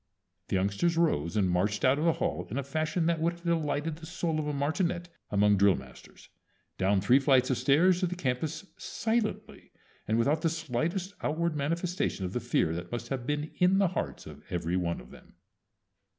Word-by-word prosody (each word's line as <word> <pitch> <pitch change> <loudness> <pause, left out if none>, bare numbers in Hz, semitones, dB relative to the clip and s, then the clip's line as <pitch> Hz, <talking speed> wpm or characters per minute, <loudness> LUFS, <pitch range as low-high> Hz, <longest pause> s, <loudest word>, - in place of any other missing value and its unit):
The - - -1
youngsters 100 - +1
rose 100 - +1
and 100 -3 +3
marched 100 +5 +1
out 130 +3 +4
of 155 - 0
the 165 - +4
hall 90 - -2
in 120 - -4
a 140 - -1
fashion 155 +4 -1
that 165 -1 +1
would 170 +1 +2
have 170 0 -16
delighted 160 -2 -1
the 160 0 -10
soul 165 -2 -1
of 150 - -2
a - - 0
martinet 170 +5 -1 0.2
among 105 0 +3
drill 100 -1 +5
masters, 65 -1 -13 0.5
down 95 +1 +2
three 125 +7 +5
flights 130 -2 +3
of 125 - 0
stairs 165 +8 +4
to 180 - +1
the 180 - -4
campus, 155 +3 -2
silently, 220 -1 -2 0.4
and 110 - +1
without 145 +7 +2
the 165 - +2
slightest 165 +5 -2
outward 165 +1 0
manifestation 165 - -1
of 90 - -5
the - - 0
fear 115 -8 +1
that 85 +1 -6
must 120 0 -4
have 130 -2 -3
been 150 +1 -2
in 180 +2 +4
the 195 -2 +3
hearts 185 - -4
of - - -11
every 85 0 -1
one 85 -2 -1
of - - -14
them. - - -16
145 Hz, 200 wpm, -29 LUFS, 105-170 Hz, 0.5 s, drill